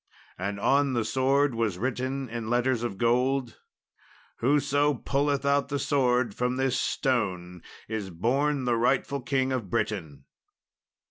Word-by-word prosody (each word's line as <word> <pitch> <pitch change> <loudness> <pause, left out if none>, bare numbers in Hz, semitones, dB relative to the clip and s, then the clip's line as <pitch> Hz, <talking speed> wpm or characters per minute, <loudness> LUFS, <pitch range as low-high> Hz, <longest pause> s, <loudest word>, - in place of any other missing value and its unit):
And 100 +2 -4
on 140 +4 +2
the 120 -3 0
sword 135 +1 +2
was 115 -5 -1
written 130 +3 -2
in 115 -1 -5
letters 120 0 +1
of 120 -5 -3
gold, 125 +2 +1 0.8
"Whoso 145 +2 +2
pulleth 140 +2 0
out 140 0 +2
the 145 - -1
sword 125 -5 +1
from 125 +3 -1
this 130 -1 0
stone 95 - -1 0.3
is 110 -3 -4
born 130 - 0
the 120 -1 +2
rightful 130 +3 +1
King 130 0 0
of 120 -7 -2
Britain." 80 -8 -3
125 Hz, 135 wpm, -27 LUFS, 115-135 Hz, 0.8 s, on